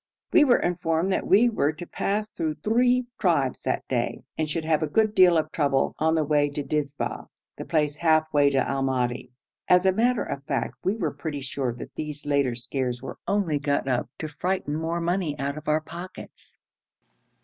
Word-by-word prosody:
We 320 - +7
were 255 -4 +5
informed 175 +1 0
that - - -1
we 215 +6 +6
were 155 -11 +1
to 155 +3 -8
pass 210 +4 -2
through 160 -5 -2
three 245 +3 +3
tribes 145 - +1
that - - -2
day, - - -2
and 155 -1 -1
should 160 +1 -2
have 155 -1 +2
a 155 - 0
good 215 +7 +2
deal 180 -4 +6
of 155 0 -1
trouble 140 -3 +1
on 160 +1 +2
the 160 - +2
way 145 -1 +2
to 145 0 -4
Dizba, 145 0 -3 0.3
the - - -7
place 150 -3 0
half 160 -1 +3
way 145 -1 +5
to 140 - 0
Al 135 0 -1
Madi. 125 -2 -1 0.4
As 180 +1 +5
a 190 - +6
matter 235 +4 +2
of 140 - -5
fact 135 -5 -2
we 190 +3 +1
were 165 -9 -1
pretty 145 0 -5
sure 130 -1 -2
that 120 - -9
these 150 -1 -5
later 140 -4 +1
scares 125 0 -3
were - - -7
only 185 -8 +1
got 140 -1 0
up 125 -2 0
to 155 - -4
frighten 155 0 -2
more 165 +2 -2
money 170 -3 -1
out 140 0 -2
of 155 0 -9
our 155 +1 +2
pockets. 175 +4 -10
155 Hz, 200 wpm, -25 LUFS, 140-180 Hz, 0.4 s, We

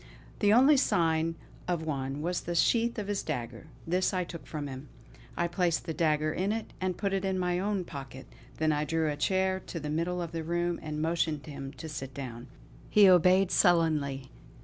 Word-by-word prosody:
The 205 - +4
only 265 +6 +6
sign 165 - +2 0.3
of 175 -3 -1
one 140 -1 -3
was 175 +1 -1
the 175 - -4
sheath 235 +7 +2
of 210 -2 -3
his 205 -1 -1
dagger; 125 -2 -5 0.2
this 185 +3 +1
I 180 - +1
took 170 -1 -9
from 150 -2 -4
him. 135 +1 -8 0.5
I 170 - +1
placed 175 -2 0
the 160 - -3
dagger 155 -1 +1
in 190 +3 0
it 225 0 -4
and 185 -1 -1
put 200 -2 -1
it 195 0 0
in 190 -1 0
my 180 -1 0
own 200 -1 -1
pocket; 135 -4 -9 0.3
then 155 0 +2
I 150 0 0
drew 160 0 0
a - - -3
chair 190 +4 +1
to 165 - -5
the 150 0 -4
middle 170 +3 -1
of 170 -2 -4
the 165 -1 -4
room 175 +1 -1
and 155 0 -4
motioned 160 -2 0
him 140 -3 -7
to 160 - -8
sit 135 -3 -6
down. 125 -3 -7 0.4
He 205 -2 +7
obeyed 185 +1 +5
sullenly. 150 -7 +2
165 Hz, 200 wpm, -29 LUFS, 150-185 Hz, 0.5 s, He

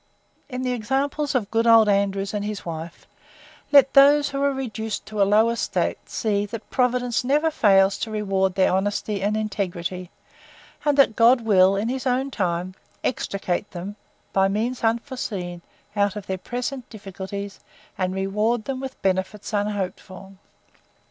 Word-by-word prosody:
In 255 -1 -4
the 250 - 0
examples 270 +5 -1
of 220 -6 -1
good 230 +1 +1
old 225 -2 +7
ANDREWS 200 -1 +1
and 205 -1 -2
his 210 -1 -5
WIFE, 165 0 -7 0.7
let 275 -2 +6
those, 285 +1 +6
who 275 0 -3
are 280 0 +3
reduced 225 -5 -4
to 215 -1 -3
a 195 - +4
low 220 +3 +4
estate, 235 - -2
see, 205 -2 -1
that 220 +1 -8
Providence 250 -1 +1
never 295 +5 +2
fails 195 -8 +4
to 225 - -3
reward 195 -3 0
their 190 -2 +3
honesty 205 +1 -1
and 210 +2 0
integrity: 185 -4 -3 0.8
and 290 -1 +2
that 275 -6 +5
God 240 +2 +5
will, 195 -3 +4
in 205 +3 -1
his 260 +2 -2
own 260 +2 0
good - - -16
time, 180 -1 -2 0.3
extricate 200 -5 -2
them, 190 +3 -7 0.4
by 195 0 +4
means 225 +6 -2
unforeseen, 225 -7 -2 0.3
out 200 -1 +1
of 205 -2 -6
their 190 -1 -3
present 250 +4 -5
difficulties, 200 -1 -7 0.4
and 185 0 -2
reward 210 +4 0
them 270 -1 -3
with 265 0 -7
benefits 190 +3 -1
unhoped 205 -2 -1
for. 190 +1 -12
210 Hz, 160 wpm, -23 LUFS, 195-250 Hz, 0.8 s, old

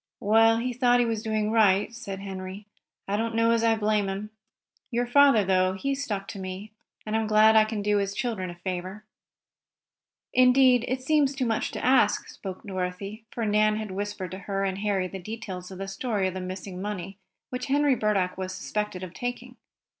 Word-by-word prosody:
"Well, 225 +2 +4
he 250 +2 -2
thought 245 0 +3
he 245 - +3
was 225 -2 -1
doing 215 -1 -1
right," 210 -1 +3
said 195 -4 -7
Henry. 190 +1 -7 0.4
"I 200 - 0
don't 225 +1 -2
know 230 0 +3
as 230 0 +2
I 225 -1 +4
blame 210 -2 +1
him. 200 +2 -5 0.6
Your 245 0 0
father, 260 -4 +5
though, 185 0 +2
he 275 +9 -2
stuck 215 -8 -3
to 200 - -7
me, 190 +3 -6 0.3
and 215 0 -2
I'm 220 -1 0
glad 215 +1 +6
I 215 0 +7
can 215 -2 -4
do 210 0 +2
his 200 0 -1
children 220 -7 -2
a 175 - -8
favor." 185 +3 -5 1.3
"Indeed, 250 -1 +5
it 255 0 -2
seems 285 -1 +2
too 265 -2 -1
much 225 -2 0
to - - -4
ask," 255 -5 +3
spoke 190 -2 -8
Dorothy, 195 +3 -5
for 230 - -3
Nan 215 0 +3
had 215 -2 -4
whispered 200 -2 -4
to 190 - -6
her 195 0 -3
and 190 0 -2
Harry 200 -3 0
the 190 +1 -7
details 190 -2 -7
of 190 - -9
the 195 +1 -5
story 195 0 -1
of 185 - -3
the 185 - -5
missing 185 0 -6
money 195 -1 -5 0.3
which 250 0 -4
Henry 285 0 +3
Burdock 195 -6 0
was 185 0 -3
suspected 210 -3 -3
of 180 -2 -7
taking. 245 +2 -5
210 Hz, 200 wpm, -26 LUFS, 190-230 Hz, 1.3 s, I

